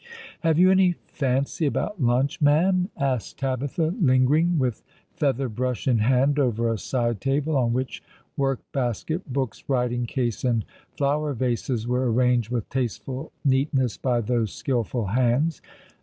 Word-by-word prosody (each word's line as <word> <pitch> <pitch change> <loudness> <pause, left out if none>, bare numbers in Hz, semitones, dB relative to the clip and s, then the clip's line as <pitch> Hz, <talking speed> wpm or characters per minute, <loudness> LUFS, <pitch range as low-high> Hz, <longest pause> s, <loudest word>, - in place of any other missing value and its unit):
" - - -17
Have 160 -2 +2
you 185 +2 +6
any 190 -1 +4
fancy 140 +3 -1
about 195 +5 -2
lunch, 135 +7 +1
ma'am? 180 +6 +3
" - - -33
asked 135 -6 -2
Tabitha, 135 +5 -1
lingering 150 +5 +3
with 125 -6 -1 0.3
feather 135 -2 0
brush 125 +2 -3
in 120 -4 +3
hand 130 +5 +3
over 115 -3 +1
a - - -3
side 120 -4 -1
table, 145 +3 0
on 120 -4 +2
which 130 +1 -2 0.3
work 135 -2 0
basket, 135 - -2
books, 130 -4 -3
writing 125 -2 0
case, 120 -3 -2
and 120 -4 +1 0.3
flower 145 +1 0
vases 120 -1 -1
were 125 0 +1
arranged 125 -1 +2
with 120 -3 -2
tasteful 130 +3 -3
neatness 130 -3 +2
by 125 -2 0
those 115 -1 0
skilful 120 -3 -2
hands. 125 - +1
130 Hz, 150 wpm, -24 LUFS, 120-145 Hz, 0.3 s, you